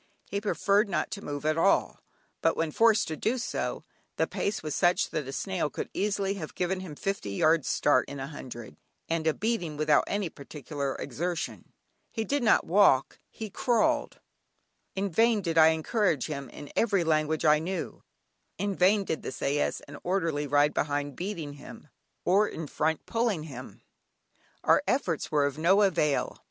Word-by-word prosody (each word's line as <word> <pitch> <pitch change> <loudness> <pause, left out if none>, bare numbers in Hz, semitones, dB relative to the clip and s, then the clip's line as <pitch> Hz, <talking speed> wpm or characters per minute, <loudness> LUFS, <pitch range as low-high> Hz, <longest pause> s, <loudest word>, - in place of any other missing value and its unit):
He 200 - -3
preferred 205 0 +2
not 180 - -1
to 200 - -6
move 145 0 -5
at 155 +1 +1
all, 195 - +2 0.4
but 165 - +2
when 160 -1 0
forced 225 +4 +4
to 160 - -3
do 225 - 0
so, 240 - -3 0.3
the - - +2
pace 200 - -3
was 155 -2 -3
such 175 -1 +2
that 150 -4 -3
a - - -5
snail 180 0 -2
could - - -6
easily 200 -1 0
have 170 -6 -7
given 185 +1 -1
him 180 -5 -8
fifty 195 - -3
yards 155 +9 +2
start 130 - +2
in 140 - -7
a 135 - -3
hundred, 120 - -9 0.3
and 165 -1 -1
a 160 - +3
beating, 200 -9 -2
without 150 -1 +3
any 200 -2 -1
particular 140 -2 -5
exertion. 170 +6 -4 0.4
He 225 - -3
did 285 +5 -1
not 230 - +4
walk, 170 -8 +4
he 220 -2 -7
crawled. 285 +8 +1 0.8
In 195 0 -1
vain 225 +4 +3
did 165 -4 +1
I 160 - +8
encourage 160 - +1
him 140 -3 -5
in 145 - -10
every 200 -6 +2
language 155 -1 +1
I 150 0 +6
knew, 180 +4 -4 0.6
in 200 0 -1
vain 195 +3 +4
did 160 - -3
the - - -5
sais 140 +3 -1
and 140 0 -11
orderly 165 -6 0
ride 145 +1 +3
behind 145 -1 -1
beating 170 -6 -5
him, 145 +1 -12 0.4
or 200 +4 +4
in 160 - -6
front 155 +2 -1
pulling 230 -8 0
him, 130 -4 -10 0.8
our - - +5
efforts 190 - 0
were 145 -2 +3
of 145 +1 -3
no 190 +6 +4
avail. 155 -7 +1
165 Hz, 175 wpm, -28 LUFS, 150-200 Hz, 0.8 s, I